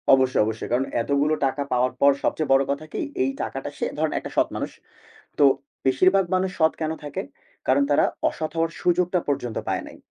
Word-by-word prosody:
অবশ্য, 130 -1 +5
অবশ্যই। 110 0 -4
কারণ 130 +2 +2 0.2
এতগুলো 140 +4 +1
টাকা 135 +1 -1
পাওয়ার 125 0 +2
পর 140 - +6
সবচেয়ে 155 -3 0
বড় 135 0 +5
কথা 140 +2 -3
কি? - - -3 0.2
এই 130 - +1
টাকাটা 135 +1 -4
সে - - 0
ধরেন 155 0 0
একটা - - -8
সৎ - - +4
মানুষ। - - -3 0.7
তো - - +3 0.4
বেশিরভাগ 185 +8 +4
মানুষ 185 0 +1
সৎ 160 0 +5
কেন 155 0 -1
থাকে? 145 -1 -4 0.5
কারণ 135 +2 +4
তারা 145 - +4 0.2
অসৎ 155 -1 -4
হওয়ার 165 0 +1
সুযোগটা 180 +1 +2
পর্যন্ত 125 -5 -2
পায় - - 0
নাই। - - -11
145 Hz, 190 wpm, -24 LUFS, 130-160 Hz, 0.7 s, পর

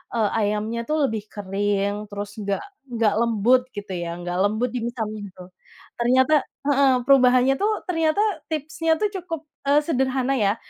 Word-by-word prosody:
eee, 220 -3 +2
ayamnya 215 +3 -1
tuh 305 -1 +1
lebih 215 -1 -5
kering 205 +1 -2
terus 205 +1 -7
enggak 200 -1 -2 0.2
enggak 230 -4 +1
lembut 235 +2 +3
gitu 205 -1 -7
ya, 170 -1 -3
enggak 175 0 -4
lembut 215 +5 +1
dimsumnya 225 -4 -4
tuh. 180 0 -12 0.5
Ternyata 255 +5 +3 0.4
heeh 275 -1 +4
perubahannya 255 0 +5
tuh, 425 0 0
ternyata 325 +1 +1 0.3
tipsnya 320 +1 -1
tuh 415 +4 -1
cukup 335 -5 -5 0.2
eee, 290 +1 +5
sederhana 265 -3 0
ya. 205 +1 +2
235 Hz, 145 wpm, -23 LUFS, 205-275 Hz, 0.5 s, perubahannya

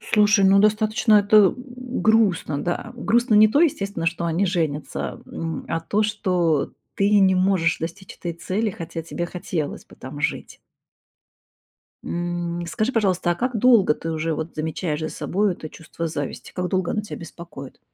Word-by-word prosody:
Слушай, 210 -1 +3
ну 195 +1 +6
достаточно 215 +1 +3
это 205 -1 +6
у 250 0 -7
грустно. 205 -10 +2
Да, 175 +7 -3
грустно 235 0 +2
не 215 +1 +7
то, 280 +8 +2
естественно, 200 - 0
что 170 +1 -1
они 170 +4 +1
женятся, 150 - -2
м, 165 -1 -5
а - - 0
то, 205 +6 0
что 180 -8 0 0.2
ты 205 +1 +3
не 190 -1 +5
можешь 185 -3 +2
достичь 175 +4 -7
этой 170 - -4
цели, 195 +6 -2
хотя 165 -2 -6
тебе 175 +1 -4
хотелось 175 -4 -4
бы - - -17
там 140 +3 -9
жить. 145 - -3 1.4
М, 175 0 -3
скажи, 215 +7 -1
пожалуйста, 190 -6 +1
а - - +2
как 250 +2 -1
долго 220 -8 +5
ты 165 - -5
уже 160 0 -1
вот 160 +2 -5
замечаешь 155 0 -2
за 155 - -2
собой 200 +4 -1
это 160 -2 -8
чувство 165 +1 -6
зависти? 145 -3 -5
Как 180 -1 -2
долго 185 -2 0
оно 210 - 0
тебя 210 - -8
беспокоит? 170 -5 -10
180 Hz, 165 wpm, -23 LUFS, 165-210 Hz, 1.4 s, не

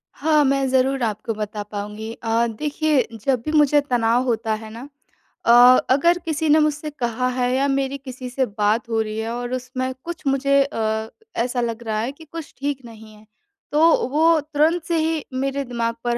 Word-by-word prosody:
हाँ, 305 0 +3
मैं 270 0 +1
ज़रूर 265 0 +1
आपको 215 +1 -2
बता 210 0 -5
पाऊँगी। 210 +2 -6
अ, 230 +1 +2
देखिए 295 +3 0 0.2
जब 260 -4 +1
भी 305 - -1
मुझे 295 -1 +4
तनाव 245 -2 +1
होता 225 -3 -1
है 220 - -9
ना। 230 +2 -9 0.6
अ, 235 - +5 0.4
अगर 340 +6 +3
किसी 315 -1 -1
ने 305 +1 +6
मुझसे 305 0 0
कहा 250 -3 -2
है 250 -1 0
या 275 +2 +2
मेरी 275 0 -1
किसी 255 -1 -8
से 260 +1 0
बात 215 +2 0
हो 225 -1 +1
रही 215 0 -4
है 225 +1 -3
और 245 +1 -4
उसमें 255 +1 -3
कुछ 340 -3 -7
मुझे 275 +1 +3
अ, 220 -5 -2 0.3
ऐसा 245 +1 -1
लग 235 0 -3
रहा 215 -2 -2
है 235 +4 -2
कि 320 +3 -15
कुछ 325 0 -9
ठीक 280 -1 -3
नहीं 220 -1 -13
है। 210 +1 -19 0.5
तो 315 -3 +4
वो 320 +3 +4
तुरंत 310 +3 +1
से 335 0 -1
ही 315 -1 0
मेरे 275 +2 -1
दिमाग़ 235 -2 -2
पर 240 0 0
255 Hz, 195 wpm, -22 LUFS, 230-290 Hz, 0.6 s, ने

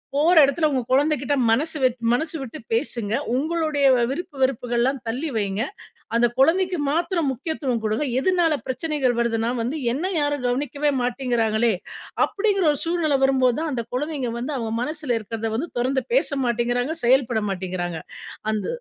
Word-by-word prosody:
போற 315 +5 +4
இடத்தில 310 +3 +1
உங்க 260 -2 +1
குழந்தைக்கிட்ட 285 0 +2
மனசு 305 +8 +1
வெ 255 - +5 0.2
மனசு 310 +6 -1
விட்டு 255 -4 -7
பேசுங்க. 225 -2 -1 0.2
உங்களுடைய 310 -1 0 0.3
விருப்பு 335 0 -5
வெறுப்புகள்லாம் 250 0 +1
தள்ளி 265 +8 -2
வைங்க. 200 0 -1 0.5
அந்த 240 +1 +4
குழந்தைக்கு 360 +6 +3
மாத்திரம் 335 -1 0
முக்கியத்துவம் 260 -3 -2
குடுங்க. 220 +7 0
எதுனால 350 0 +2
பிரச்சனைகள் 260 -2 0
வருதுன்னா 230 0 0
வந்து 255 +7 -2 0.2
என்ன 360 +8 -2
யாரும் 290 -3 -1
கவனிக்கவே 285 +3 0
மாட்டேங்கிறாங்களே! 235 -3 +1 0.5
அப்படிங்ற 395 -2 0
ஒரு 285 - -2
சூழ்நில 330 -4 +1
வரும் 270 -1 +2
போது 250 0 +3
தான் 320 -2 -2
அந்த 235 -2 -2
குழந்தைங்க 280 -3 -2
வந்து 270 +4 -3
அவங்க 225 -2 -3
மனசுல 295 -3 -2
இருக்கிறத 225 +1 -4
வந்து 320 +8 -2
தொறந்து 260 +2 0
பேச - - +3 0.2
மாட்டேங்கிறாங்க! 245 +5 0
செயல்பட 240 -3 +3
மாட்டேங்கிறாங்க! 180 -3 -3 0.5
அந்த 215 -1 -2
265 Hz, 145 wpm, -23 LUFS, 235-310 Hz, 0.5 s, வெ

